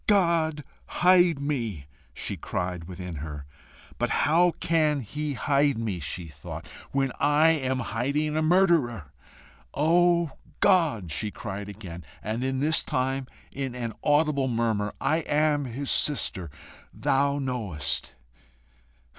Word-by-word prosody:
"God 170 -6 +2 0.2
hide 175 -4 +4
me," 115 - -3 0.3
she - - -4
cried 90 -2 -4
within 90 -2 -7
her. 75 -1 -6 0.5
"But - - +1 0.2
how 170 +3 +4
can 155 -3 +2
he 150 +5 -4
hide 140 -1 +2
me," 110 -6 -2
she 85 +3 -4
thought, 75 - -8 0.3
"when 135 -1 +1
I 150 +3 +4
am 130 -5 +1
hiding 140 +7 -1
a 155 - +2
murderer?" 155 - +2 0.6
"O 170 +1 +3 0.3
God," 155 - +3
she 105 +8 -1
cried 100 -2 -6
again, 90 -4 -9 0.2
and 110 +3 -2 0.2
this 155 0 +3
time 130 +1 -1 0.2
in 135 -2 -4
an 120 -2 -4
audible 145 -2 +3
murmur, 115 -4 0
"I 155 - +2
am 150 -2 +1
his 130 +3 -3
sister, 95 - +1 0.4
thou 140 +1 +1
knowest!" 100 - -2
135 Hz, 120 wpm, -26 LUFS, 105-155 Hz, 0.6 s, hide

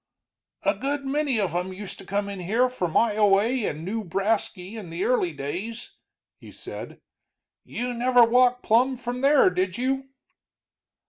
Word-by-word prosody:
"A - - +3
good 280 +1 -3
many 275 -3 0
of 195 -4 -1
'em 180 +1 -2
used 195 0 -8
to - - -11
come 200 +1 -1
in 200 -1 -6
here 225 +8 +1
from 180 -10 -3
Ioway 215 +2 +3
and 155 +4 -7
Newbrasky 205 -1 -2
in 205 -6 -8
the 170 +3 -3
early 245 -9 +1
days," 175 +11 -6 0.5
he - - -13
said. - - -8 0.6
"You 245 +1 -4
never 245 0 +4
walked 250 +1 +3
plumb 250 +4 +3
from 245 +1 -5
there, 275 -7 +5
did 180 0 -1
you?" 265 +2 -1
225 Hz, 150 wpm, -25 LUFS, 190-250 Hz, 0.6 s, there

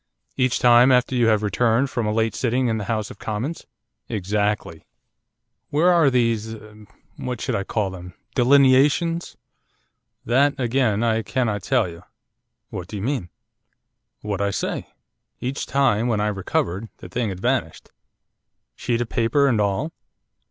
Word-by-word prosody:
'Each 130 -2 +1
time 120 +1 +6
after 125 0 +3
you 120 -2 +3
have 110 -1 +2
returned 115 +5 +1
from 120 -4 -1
a - - +1
late 110 0 0
sitting 125 +1 0
in 110 -1 -1
the 105 - -4
House 110 -1 -2
of - - -13
Commons?' 120 +10 -4 0.4
'Exactly.' 105 -4 -2 0.9
'Where 170 +5 +3
are 165 -5 +5
these 115 -3 0 0.6
what 125 -2 -4
shall - - -2
I 100 - -1
call 100 -1 -2
them 90 -1 -10 0.2
delineations?' 140 +6 +3 0.9
'That, 140 +5 +2
again, 120 -3 +1
I 115 -1 +1
cannot 110 -1 -1
tell 125 0 +1
you.' 85 0 -10 0.7
'What 95 -4 -6
do 105 - -8
you 100 - -5
mean?' 125 -8 -2 0.9
'What 100 -2 -3
I 100 - +1
say. - - -3 0.5
Each 130 +3 -4
time, 120 -5 +2
when 115 -3 0
I 105 0 +1
recovered, 95 +1 -2
the - - -10
thing 115 +4 -2
had 95 -2 -6
vanished.' - - -2 0.8
'Sheet 120 -1 -1
of 120 - -3
paper 125 +5 +2
and 120 -6 +2
all? 105 +11 -1
115 Hz, 150 wpm, -22 LUFS, 105-130 Hz, 0.9 s, time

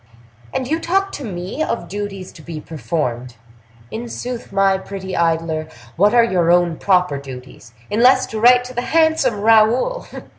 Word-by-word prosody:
And 255 - -3
you 320 +4 0
talk 390 +4 0
to 285 - -7
me 185 - -5
of 235 - -2
duties 195 -1 -6
to 155 - -14
be 160 0 -7
performed! 125 -7 -4 0.6
In 235 +2 -6
sooth, 245 0 -6
my 195 -1 +2
pretty 190 -1 -7
idler, 165 -1 0 0.3
what 205 +6 +3
are 235 - +6
your 180 -6 +2
own 175 -2 +2
proper 180 -7 +1
duties, 125 -4 -11 0.2
unless 255 +4 +4
to 220 - -2
write 245 +2 +6
to 250 0 -9
the 245 - -2
handsome 315 -5 +2
Raoul? 225 - +3
195 Hz, 160 wpm, -19 LUFS, 165-245 Hz, 0.6 s, are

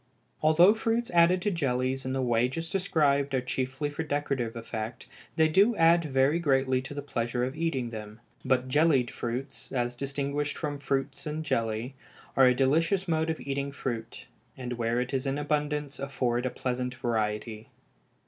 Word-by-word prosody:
Although 170 +6 +6
fruits 225 +1 -1
added 175 +1 +4
to 205 - +1
jellies 130 -5 -1
in 130 - -2
the 135 -1 0
way 120 0 +2
just 165 +5 -5
described 140 -7 +1
are - - +3
chiefly 130 +3 -2
for 145 - -4
decorative 140 -6 -2
effect, 115 0 -5 0.3
they 160 -1 +4
do 200 +9 +4
add 165 -1 +4
very 135 +3 +2
greatly 135 -4 +2
to 140 +2 -8
the 145 - -4
pleasure 120 -3 -2
of 130 +3 -2
eating 145 -7 -1
them; 105 -1 -8 0.2
but 130 -1 +1
jellied 140 -3 +3
fruits, 130 +4 -5
as 120 -2 -1
distinguished 140 +2 -2
from 145 -3 -3
fruits 135 +2 -2
in 155 +1 -3
jelly, 115 -2 -1 0.4
are 135 -1 +7
a 125 - +4
delicious 165 +9 +2
mode 160 -1 +1
of 160 - -2
eating 140 0 -3
fruit, 120 -4 -5 0.3
and 125 -1 -4
where 120 0 0
it 125 +2 -3
is 135 +1 -1
in 135 +1 0
abundance 150 -1 -2
afford 130 -3 -1
a - - -1
pleasant 125 0 -3
variety. 110 -2 -2
135 Hz, 170 wpm, -28 LUFS, 125-155 Hz, 0.4 s, are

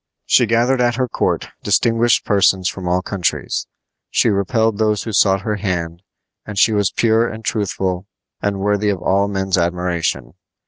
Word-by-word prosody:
She 120 - +4
gathered 120 +3 +2
at 120 -1 +2
her 130 0 0
court - - -1
distinguished 115 0 +2
persons 95 -3 +2
from 95 -2 -4
all 90 +1 0
countries. 95 -3 -2 0.4
She - - +2
repelled 110 +1 0
those 105 -2 +1
who 110 - -5
sought 95 -1 +3
her 105 +1 -2
hand, 85 -4 -3 0.4
and 105 -2 -8
she 110 - +4
was 100 -3 +2
pure 115 0 +2
and 110 0 -9
truthful 95 -3 -2 0.3
and 100 -1 -2
worthy 105 +1 +1
of 100 - 0
all 100 +1 +2
men's 95 -2 -1
admiration. 85 -1 -2
100 Hz, 165 wpm, -18 LUFS, 95-110 Hz, 0.4 s, She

